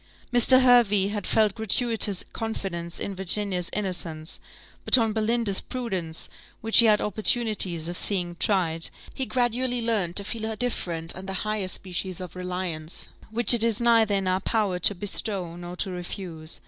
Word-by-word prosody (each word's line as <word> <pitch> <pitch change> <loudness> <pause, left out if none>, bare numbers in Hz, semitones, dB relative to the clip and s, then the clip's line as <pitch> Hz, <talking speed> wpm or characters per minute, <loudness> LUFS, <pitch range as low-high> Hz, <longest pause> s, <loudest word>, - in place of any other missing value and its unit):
Mr. 255 +2 +6
Hervey 215 -6 +4
had 205 -2 -4
felt 215 -2 +2
gratuitous 220 -2 +1
confidence 185 -7 -4
in 200 - -3
Virginia's 190 -1 0
innocence; 175 -5 -3 0.4
but - - +7
on 225 -3 +1
Belinda's 220 -2 +1
prudence, 190 -11 -4 0.3
which 225 0 +5
he 235 - +7
had 210 -1 +4
opportunities 210 -6 +1
of 175 - -5
seeing 175 -4 0
tried, 165 -5 0 0.2
he 265 -2 -3
gradually 245 0 0
learned 215 -7 0
to 200 - +1
feel 220 +1 -4
a 220 - -3
different 170 -9 -3
and 190 +1 -8
a - - -3
higher 215 -3 -2
species 185 -1 -4
of 180 -2 -8
reliance, 180 -3 -5 0.2
which 230 +1 +5
it 235 -2 +4
is 230 -2 +2
neither 230 -3 +3
in 195 -1 -1
our 185 0 +1
power 205 -5 0
to 200 +3 +3
bestow 190 -2 -3
nor 175 0 -8
to 190 +1 -3
refuse. 175 -3 -7
200 Hz, 160 wpm, -25 LUFS, 180-225 Hz, 0.4 s, but